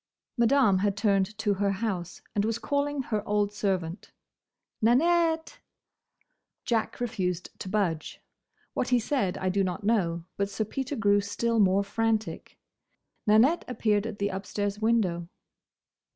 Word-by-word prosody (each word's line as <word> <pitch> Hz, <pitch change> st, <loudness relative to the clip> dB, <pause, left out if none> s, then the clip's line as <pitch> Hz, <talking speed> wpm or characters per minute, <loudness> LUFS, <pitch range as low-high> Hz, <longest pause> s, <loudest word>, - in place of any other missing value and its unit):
Madame 235 Hz, -5 st, +4 dB
had 200 Hz, 0 st, 0 dB
turned 200 Hz, -1 st, +1 dB
to 215 Hz, -2 st, +1 dB
her 200 Hz, 0 st, 0 dB
house 190 Hz, -4 st, -4 dB
and 205 Hz, -, +1 dB
was 225 Hz, +1 st, 0 dB
calling 285 Hz, +2 st, -1 dB
her 215 Hz, -4 st, -1 dB
old 205 Hz, 0 st, +1 dB
servant. 190 Hz, -4 st, -2 dB, 0.7 s
"Nanette!" 325 Hz, -, +2 dB, 1.1 s
Jack 225 Hz, -2 st, -1 dB
refused 185 Hz, -8 st, -2 dB
to 185 Hz, -, -6 dB
budge. 180 Hz, -7 st, -1 dB, 0.5 s
What 250 Hz, -, -1 dB
he 250 Hz, -, +4 dB
said 225 Hz, -6 st, -1 dB
I 185 Hz, -, -1 dB
do 195 Hz, +1 st, +1 dB
not 185 Hz, +2 st, -3 dB
know; 175 Hz, -6 st, +1 dB
but 200 Hz, 0 st, 0 dB
Sir 210 Hz, +2 st, -2 dB
Peter 265 Hz, +5 st, -4 dB
grew 205 Hz, -3 st, +3 dB
still 220 Hz, +3 st, -1 dB
more 195 Hz, 0 st, +4 dB
frantic. 220 Hz, +2 st, -2 dB, 0.7 s
Nanette 235 Hz, +11 st, +5 dB
appeared 215 Hz, -3 st, +1 dB
at 220 Hz, -2 st, -6 dB
the 200 Hz, 0 st, 0 dB
upstairs 200 Hz, +1 st, -3 dB
window. 205 Hz, -7 st, +1 dB
210 Hz, 135 wpm, -28 LUFS, 195-230 Hz, 1.1 s, Nanette